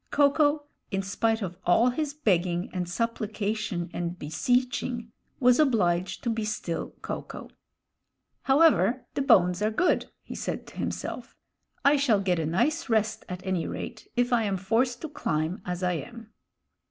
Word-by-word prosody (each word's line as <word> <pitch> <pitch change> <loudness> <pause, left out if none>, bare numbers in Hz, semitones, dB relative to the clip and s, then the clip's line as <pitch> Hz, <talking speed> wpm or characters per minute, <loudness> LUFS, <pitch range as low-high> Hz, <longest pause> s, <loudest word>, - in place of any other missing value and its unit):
Ko 285 -1 +4
ko, 295 0 +2 0.3
in 195 -1 -1
spite 220 +3 0
of 180 -1 -5
all 230 +8 +4
his 295 +3 -2
begging 180 - +1
and 180 -2 -2
supplication 215 -3 -2
and 175 0 -3
beseeching, 240 - -1 0.3
was 250 -1 +5
obliged 185 - +2
to 235 - 0
be 225 -1 -2
still 210 -5 -3
Ko - - -3
ko. - - -10 1.0
"However, 270 -3 +4
the - - -1
bones 180 -8 +4
are 215 - +2
good," 290 +12 +1 0.2
he - - -8
said - - -4
to - - -14
himself. - - -4 0.5
"I 285 +1 +6
shall 250 -7 +3
get 185 -3 +1
a 160 - -1
nice 270 - 0
rest, 220 -1 +1
at 180 +1 -6
any 185 -3 -1
rate, - - -6
if 245 0 +2
I 235 - +4
am 195 -2 0
forced 230 +7 0
to 315 - -4
climb 165 - -2
as 180 0 -3
I 180 0 +2
am." 230 +5 -7
220 Hz, 165 wpm, -27 LUFS, 180-250 Hz, 1.0 s, I